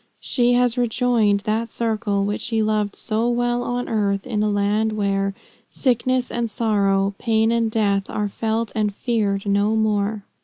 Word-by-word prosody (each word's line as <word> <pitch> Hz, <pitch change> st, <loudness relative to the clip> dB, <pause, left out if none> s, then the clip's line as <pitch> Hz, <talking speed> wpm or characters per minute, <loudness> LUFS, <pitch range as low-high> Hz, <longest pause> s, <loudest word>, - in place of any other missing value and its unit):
She 245 Hz, -1 st, +1 dB
has 245 Hz, 0 st, +2 dB
rejoined 230 Hz, -4 st, +2 dB
that 220 Hz, +3 st, -1 dB
circle, 215 Hz, -3 st, -1 dB
which 205 Hz, +1 st, -2 dB
she 225 Hz, -2 st, 0 dB
loved 210 Hz, -1 st, 0 dB
so 225 Hz, +1 st, -1 dB
well 240 Hz, 0 st, 0 dB
on 245 Hz, 0 st, -3 dB
earth, 200 Hz, -3 st, 0 dB
in 225 Hz, -5 st, -2 dB
a 210 Hz, -, +1 dB
land 210 Hz, +2 st, +1 dB
where 195 Hz, -1 st, -1 dB, 0.3 s
"Sickness 255 Hz, 0 st, 0 dB
and 235 Hz, -1 st, -2 dB
sorrow, 200 Hz, -3 st, +1 dB
pain 225 Hz, -1 st, +2 dB
and 230 Hz, -1 st, +1 dB
death 200 Hz, -3 st, 0 dB
Are 210 Hz, -1 st, -1 dB
felt 225 Hz, +2 st, -2 dB
and 210 Hz, -2 st, -1 dB
feared 205 Hz, -5 st, -1 dB
no 205 Hz, +2 st, +2 dB
more." 210 Hz, -1 st, 0 dB
220 Hz, 160 wpm, -22 LUFS, 205-235 Hz, 0.3 s, has